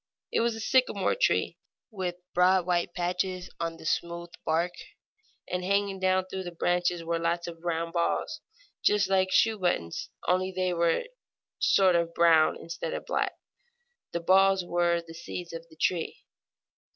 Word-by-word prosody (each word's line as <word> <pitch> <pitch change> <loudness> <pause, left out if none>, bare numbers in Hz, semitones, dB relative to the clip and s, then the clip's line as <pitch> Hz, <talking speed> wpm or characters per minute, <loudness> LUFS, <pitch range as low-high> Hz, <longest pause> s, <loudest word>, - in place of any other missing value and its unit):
It - - +1
was 235 0 +1
a - - -7
sycamore 225 -4 +2
tree, - - +1 0.3
with 185 -4 -3 0.2
broad 180 0 +4
white 175 -1 0
patches 180 +1 -2
on 165 0 -3
the - - -12
smooth 170 +1 -2
bark, 165 +3 +1 0.8
and 180 0 -2
hanging 200 0 0
down 185 0 +2
from 190 0 -5
the 175 - -5
branches 175 0 0
were 165 0 -1
lots 170 +1 -1
of 165 -1 -9
round 165 -1 -2
balls, 290 - -1 0.4
just 200 -2 +3
like 190 -1 +3
shoe 220 +1 +3
buttons, 130 - -1 0.2
only 185 +1 +2
they 185 -1 -1
were 170 -1 +2
a 480 - -11 0.5
sort 190 -2 +4
of 170 0 0
brown 165 -2 +5
instead 170 - -5
of - - -6
black. - - -1 0.8
The 170 - -2
balls 190 +1 +4
were 175 -1 +1
the 165 - -11
seeds 170 +1 -7
of 165 0 -7
the 160 - -17
tree. 175 -3 -1
175 Hz, 165 wpm, -28 LUFS, 170-190 Hz, 0.8 s, brown